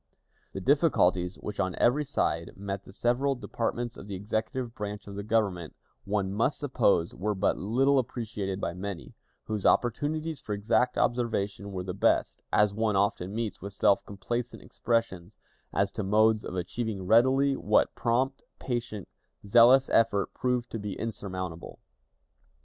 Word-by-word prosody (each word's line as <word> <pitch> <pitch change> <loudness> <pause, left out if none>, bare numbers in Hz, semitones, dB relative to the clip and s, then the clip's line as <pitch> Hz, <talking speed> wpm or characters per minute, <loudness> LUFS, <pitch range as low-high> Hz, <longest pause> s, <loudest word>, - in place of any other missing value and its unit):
The 95 - -5
difficulties 95 - +2
which 105 - -7
on 95 0 0
every 145 +5 +2
side 85 -11 -1
met 100 0 -5
the - - -12
several 125 +6 +1
departments 120 +1 -3
of - - -10
the 100 - -5
executive 110 +5 -3
branch 105 -3 -6
of 100 - -9
the 100 - -4
Government 100 -6 -1 0.3
one 100 -1 -1
must 115 +7 +1
suppose 120 - +1
were 105 +3 -2
but 95 +1 +1
little 135 +7 +3
appreciated 110 -6 -3
by 85 - -2
many, 95 0 -6 0.3
whose 105 -3 -3
opportunities 150 +6 +1
for 105 - -4
exact 105 +5 +1
observation 100 -5 -1
were 90 -2 -4
the 90 0 -4
best, 100 - +1
as 105 -1 +3
one 110 -1 0
often 95 0 0
meets 115 -2 -3
with 100 0 -6
self 100 0 +3
complacent 120 +5 -5
expressions 110 -6 -2 0.3
as 100 0 +1
to 110 - -4
modes 110 +2 +3
of - - -6
achieving 100 +2 -3
readily 130 +6 +4
what - - +2
prompt, 130 +3 0 0.2
patient, 120 -6 -4 0.4
zealous 120 +5 +6
effort 110 -3 +2
proved 125 -1 -1
to 115 - -4
be 100 -1 -4
insurmountable. 95 -6 -5
105 Hz, 150 wpm, -28 LUFS, 100-120 Hz, 0.4 s, zealous